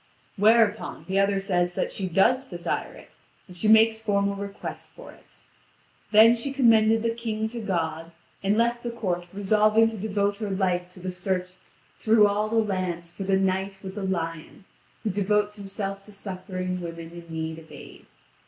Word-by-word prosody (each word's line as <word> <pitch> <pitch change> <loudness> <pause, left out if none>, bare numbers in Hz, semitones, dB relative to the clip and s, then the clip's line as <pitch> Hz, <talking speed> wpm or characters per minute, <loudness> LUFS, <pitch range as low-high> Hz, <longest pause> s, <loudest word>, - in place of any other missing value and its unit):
Whereupon, 215 -5 +2
the 190 +1 +1
other 195 0 +2
says 180 -2 0
that - - -1
she 190 - -3
does 250 +9 +3
desire 175 -4 -4
it, - - -15 0.3
and 180 - -13
she 195 +5 -1
makes 220 0 +5
formal 200 -2 +1
request 200 0 -7
for - - -11
it. - - -19 0.7
Then 220 +2 +8
she 240 +4 -3
commended 225 -4 +4
the 230 0 +1
King 220 -2 -3
to 235 +1 -6
God, 165 -4 -2 0.3
and 200 +2 +1
left 235 +1 +1
the 240 - -4
court 180 -7 -3
resolving 215 +3 +3
to 220 -2 -7
devote 200 0 0
her 210 -1 -4
life 180 -2 0
to 185 - -12
the 185 +1 -4
search 180 0 -2 0.5
through 220 -1 +5
all 205 +1 +1
the 225 - -2
land 185 -6 -1
for 175 +3 -7
the 190 0 +2
Knight 190 0 -1
with 190 0 -6
the 205 - -5
Lion, 165 -1 -4 0.4
who 215 - 0
devotes 210 +2 0
himself 195 0 -5
to 210 - -13
succouring 185 -2 -5
women 165 -1 -7
in 170 0 -11
need 160 0 -4
of 160 - -16
aid. - - -13
200 Hz, 180 wpm, -26 LUFS, 180-215 Hz, 0.7 s, Then